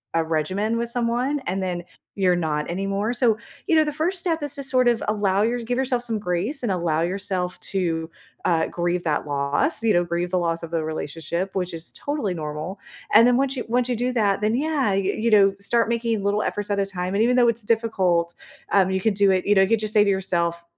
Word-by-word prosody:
a 165 Hz, -, +3 dB
regimen 185 Hz, +8 st, -1 dB
with 235 Hz, 0 st, -1 dB
someone 245 Hz, +4 st, 0 dB
and 190 Hz, +1 st, -2 dB
then 180 Hz, -2 st, -3 dB, 0.3 s
you're 180 Hz, -2 st, +3 dB
not 150 Hz, -3 st, -2 dB
anymore, 195 Hz, +5 st, -1 dB
so, 240 Hz, -3 st, +2 dB, 0.3 s
you 330 Hz, -, +3 dB
know, 315 Hz, -, +6 dB
the 300 Hz, -, -2 dB
1st 325 Hz, +6 st, -1 dB
step 330 Hz, -2 st, -1 dB
is 290 Hz, -1 st, -3 dB
to 280 Hz, -, -5 dB
sort 255 Hz, -2 st, +2 dB
of 240 Hz, -2 st, +2 dB
allow 205 Hz, -2 st, +1 dB
your 235 Hz, +3 st, +1 dB
give 245 Hz, +2 st, -2 dB
yourself 255 Hz, -2 st, 0 dB
some 230 Hz, -2 st, -2 dB
grace 205 Hz, -, -2 dB
and 225 Hz, -, 0 dB
allow 170 Hz, -3 st, 0 dB
yourself 185 Hz, 0 st, -2 dB
to, 165 Hz, -4 st, -2 dB, 0.4 s
uh, 165 Hz, -2 st, +2 dB
grieve 175 Hz, 0 st, -2 dB
that 155 Hz, -3 st, -1 dB
loss, 145 Hz, -, 0 dB
you 225 Hz, -, +3 dB
know? 175 Hz, -2 st, +3 dB
Grieve 175 Hz, +1 st, -2 dB
the 185 Hz, -, +1 dB
loss 170 Hz, -1 st, -1 dB
of 165 Hz, -, -7 dB
the 165 Hz, -1 st, 0 dB
relationship, 165 Hz, +4 st, -4 dB
which 180 Hz, -2 st, -2 dB
is 165 Hz, 0 st, -7 dB
totally 285 Hz, -10 st, -3 dB
normal. 155 Hz, +4 st, -5 dB, 0.3 s
And 230 Hz, +3 st, +8 dB
then, 245 Hz, -, +4 dB
once 270 Hz, +1 st, 0 dB
you 245 Hz, -, -3 dB
once 245 Hz, +2 st, 0 dB
you 245 Hz, -, 0 dB
do 250 Hz, +2 st, -1 dB
that, 205 Hz, -5 st, +2 dB
then, 215 Hz, +2 st, +1 dB
yeah, 280 Hz, -5 st, +1 dB
y -, -, +1 dB, 0.2 s
you 230 Hz, +2 st, +1 dB
know, 200 Hz, -3 st, +5 dB
start 230 Hz, +3 st, +1 dB
making 230 Hz, -3 st, -1 dB
little 205 Hz, +1 st, +1 dB
efforts 205 Hz, -1 st, -3 dB
at 200 Hz, -1 st, 0 dB
a 200 Hz, -, +2 dB
time, 185 Hz, -1 st, -4 dB
and 205 Hz, -, +2 dB
even 245 Hz, +2 st, +3 dB
though 245 Hz, -1 st, +5 dB
it's 230 Hz, -1 st, -2 dB
difficult, 190 Hz, -7 st, +1 dB, 0.4 s
um, 190 Hz, -2 st, +4 dB
you 190 Hz, 0 st, -1 dB
could 215 Hz, 0 st, +1 dB
do 200 Hz, 0 st, +4 dB
it, 185 Hz, -1 st, +1 dB
you 205 Hz, -, +4 dB
know, 190 Hz, -, +6 dB
you 210 Hz, +4 st, +3 dB
just 215 Hz, -1 st, -3 dB
say 210 Hz, -1 st, +5 dB
to -, -, +2 dB
yourself 170 Hz, -3 st, 0 dB
200 Hz, 235 wpm, -23 LUFS, 175-235 Hz, 0.4 s, And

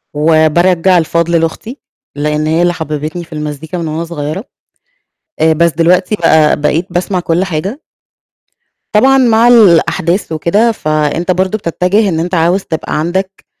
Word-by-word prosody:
وبارجَّع 165 Hz, +4 st, +2 dB
الفضل 170 Hz, +1 st, 0 dB
لأختي. 220 Hz, -, -4 dB, 0.4 s
لإن 150 Hz, +1 st, -1 dB
هي 160 Hz, +2 st, +1 dB
اللي 175 Hz, 0 st, +2 dB
حبِّبتني 155 Hz, +1 st, -5 dB
في 160 Hz, -, -13 dB
المزيكا 150 Hz, +3 st, -6 dB
من 165 Hz, -2 st, -4 dB
وأنا 160 Hz, +2 st, -3 dB
صغيرة. 165 Hz, +3 st, -5 dB, 1.0 s
آآ 160 Hz, 0 st, +3 dB
بس 170 Hz, +1 st, +2 dB
دلوقتي 180 Hz, +5 st, +1 dB
بقى، 160 Hz, -4 st, +3 dB
بقيت 155 Hz, +5 st, 0 dB
باسمع 180 Hz, +1 st, -2 dB
كل 170 Hz, +1 st, 0 dB
حاجة. 195 Hz, -, -4 dB, 1.1 s
طبعًا 270 Hz, +5 st, +4 dB
مع 235 Hz, -2 st, +3 dB
الأحداث 185 Hz, -5 st, +3 dB
وكده 200 Hz, +9 st, +1 dB
فأنت 155 Hz, 0 st, -1 dB
برضه 185 Hz, +4 st, -1 dB
بتتجه 195 Hz, +3 st, 0 dB
إن 160 Hz, -2 st, -2 dB
أنت 180 Hz, +2 st, -2 dB
عاوز 175 Hz, +4 st, +1 dB
تبقى 160 Hz, -3 st, -4 dB
عندك 190 Hz, +4 st, -3 dB
170 Hz, 140 wpm, -12 LUFS, 160-190 Hz, 1.1 s, طبعًا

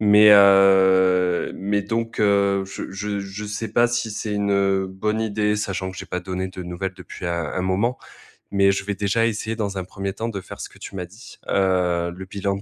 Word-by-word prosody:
Mais, 105 Hz, 0 st, +6 dB
heu, 95 Hz, -2 st, +5 dB
mais 100 Hz, +1 st, -1 dB
donc, 115 Hz, +2 st, -3 dB
heu, 100 Hz, -1 st, +3 dB
je 95 Hz, 0 st, -7 dB
je 100 Hz, +1 st, -3 dB
je 100 Hz, +2 st, -7 dB
sais 105 Hz, +2 st, -4 dB
pas 120 Hz, 0 st, +4 dB
si 120 Hz, -1 st, -2 dB
c'est 105 Hz, 0 st, -4 dB
une, 100 Hz, 0 st, 0 dB
heu, 95 Hz, -1 st, +2 dB
bonne 105 Hz, +4 st, -2 dB
idée, 105 Hz, -1 st, 0 dB
sachant 100 Hz, -2 st, -3 dB
que 95 Hz, -, -12 dB
j'ai -, -, -6 dB
pas 90 Hz, -, -3 dB
donné 95 Hz, 0 st, -4 dB
de 95 Hz, 0 st, -8 dB
nouvelles 90 Hz, +2 st, -4 dB
depuis 90 Hz, -, -10 dB
un 85 Hz, -1 st, -1 dB
un 90 Hz, -, -2 dB
moment. 100 Hz, +7 st, 0 dB, 0.6 s
Mais 100 Hz, 0 st, +4 dB
je 95 Hz, 0 st, -3 dB
vais 100 Hz, -, -2 dB
déjà 105 Hz, +3 st, +1 dB
essayer 110 Hz, 0 st, -3 dB
dans 100 Hz, -3 st, -3 dB
un -, -, -4 dB
1er 95 Hz, 0 st, -5 dB
temps 115 Hz, +3 st, -4 dB
de 100 Hz, -, -4 dB
faire -, -, -10 dB
ce -, -, -6 dB
que -, -, -19 dB
tu -, -, -9 dB
m'as 90 Hz, -2 st, -4 dB
dit. 105 Hz, +7 st, -15 dB
Heu, 90 Hz, -3 st, +1 dB
le 95 Hz, +1 st, -8 dB
bilan 100 Hz, +1 st, -2 dB
de 100 Hz, -, -7 dB
100 Hz, 225 wpm, -22 LUFS, 95-105 Hz, 0.6 s, Mais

